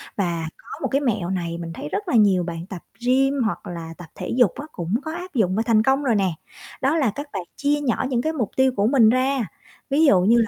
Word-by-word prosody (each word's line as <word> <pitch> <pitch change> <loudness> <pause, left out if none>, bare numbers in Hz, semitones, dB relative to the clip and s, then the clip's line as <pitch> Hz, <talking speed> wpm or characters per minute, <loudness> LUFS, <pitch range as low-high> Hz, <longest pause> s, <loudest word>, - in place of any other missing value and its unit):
và 170 -4 -1
có - - -22
một - - 0
cái 275 - +2
mẹo 215 -10 0
này 170 -3 -2
mình 165 -1 -6
thấy 150 - -6
rất 410 - -3
là 320 - 0
nhiều 200 -5 +4
bạn 170 -1 -5
tập 180 -3 -7 0.2
gym 270 +2 +3
hoặc 220 - -3
là 165 -2 -6
tập 175 - -10
thể - - -6
dục 245 -8 +5
á 290 - -6
cũng 175 +2 -4
có 315 - -3
áp 360 0 -7
dụng 195 -8 +1
và 220 - +1
thành 220 -2 +4
công 270 +3 +2
rồi 240 -5 +2
nè. 195 -2 +2 0.5
Đó 280 +5 +2
là 265 -9 +2
các 285 +1 -5
bạn - - -3
chia 290 +1 +1
nhỏ 255 -4 0
những 245 -3 +1
cái 315 +4 -1
mục 240 -10 -2
tiêu 265 0 +4
của 200 +1 +2
mình 240 -4 +5
ra. 255 -1 +1 0.4
Ví 295 +4 +4
dụ 195 -11 +5
như 220 +6 +4
là 230 -1 +3
230 Hz, 265 wpm, -23 LUFS, 185-270 Hz, 0.5 s, dục